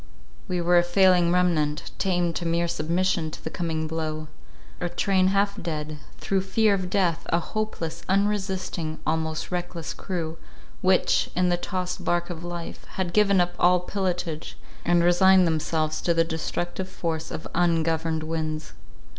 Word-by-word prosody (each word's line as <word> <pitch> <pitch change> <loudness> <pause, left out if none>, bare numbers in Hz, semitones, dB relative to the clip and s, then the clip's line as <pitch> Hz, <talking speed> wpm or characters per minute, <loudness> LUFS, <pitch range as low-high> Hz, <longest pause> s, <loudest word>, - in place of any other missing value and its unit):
We 180 -2 -1
were 175 +1 +5
a - - +3
failing 175 -1 +4
remnant, 160 -5 +1
tamed 175 -3 +1
to 170 - -4
mere 170 +1 +1
submission 170 0 0
to - - -10
the 160 - -4
coming 160 -2 -2
blow. 155 -1 -3 0.5
A 175 - -2
train 185 +1 +2
half 200 +1 +1
dead, 155 -3 -4 0.2
through 195 -1 0
fear 200 +3 +2
of 185 -2 -1
death—a 175 -3 +1
hopeless, 170 -5 -4
unresisting, 190 -5 0
almost 160 +1 -1
reckless 175 -2 -3
crew, 165 -3 -4 0.4
which, 185 0 +3
in 180 0 +3
the 175 - +3
tossed 180 0 -3
bark 175 0 0
of 170 -1 -7
life, 175 -1 -6
had 180 -3 -2
given 200 -2 +4
up 175 0 +2
all 180 0 +5
pilotage, 180 -4 -3 0.3
and 175 0 +3
resigned 185 +1 +6
themselves 155 -1 0
to 170 - +1
the 165 - +4
destructive 175 +3 -3
force 165 -3 -3
of 160 - -6
ungoverned 165 -2 +1
winds. 155 -1 -3
175 Hz, 150 wpm, -25 LUFS, 160-185 Hz, 0.5 s, resigned